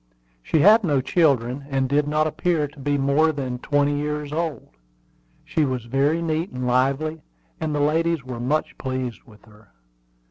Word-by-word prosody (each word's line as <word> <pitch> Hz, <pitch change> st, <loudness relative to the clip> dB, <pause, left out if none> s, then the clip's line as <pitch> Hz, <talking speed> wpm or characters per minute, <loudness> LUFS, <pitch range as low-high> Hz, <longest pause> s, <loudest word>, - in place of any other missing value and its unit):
She 150 Hz, -, +1 dB
had 215 Hz, +5 st, +7 dB
no 145 Hz, -6 st, +2 dB
children, 135 Hz, -3 st, +1 dB
and 135 Hz, -1 st, 0 dB
did 145 Hz, +2 st, +1 dB
not 155 Hz, +1 st, +1 dB
appear 155 Hz, -1 st, 0 dB
to 145 Hz, +1 st, -17 dB
be 145 Hz, +1 st, 0 dB
more 140 Hz, +4 st, +3 dB
than 130 Hz, -4 st, -4 dB
twenty 145 Hz, +1 st, +1 dB
years 150 Hz, 0 st, -3 dB
old. 160 Hz, -6 st, -3 dB, 0.8 s
She 155 Hz, -, 0 dB
was 130 Hz, -4 st, -2 dB
very 140 Hz, +7 st, +1 dB
neat 165 Hz, +2 st, -1 dB
and 125 Hz, 0 st, -5 dB
lively, 135 Hz, +6 st, 0 dB, 0.4 s
and 155 Hz, -2 st, -2 dB
the 145 Hz, -, 0 dB
ladies 160 Hz, 0 st, +1 dB
were 125 Hz, -2 st, -7 dB
much 145 Hz, +6 st, -1 dB
pleased 130 Hz, -3 st, -4 dB
with 105 Hz, -3 st, -18 dB
her. 105 Hz, -1 st, -20 dB
145 Hz, 170 wpm, -23 LUFS, 130-155 Hz, 0.8 s, had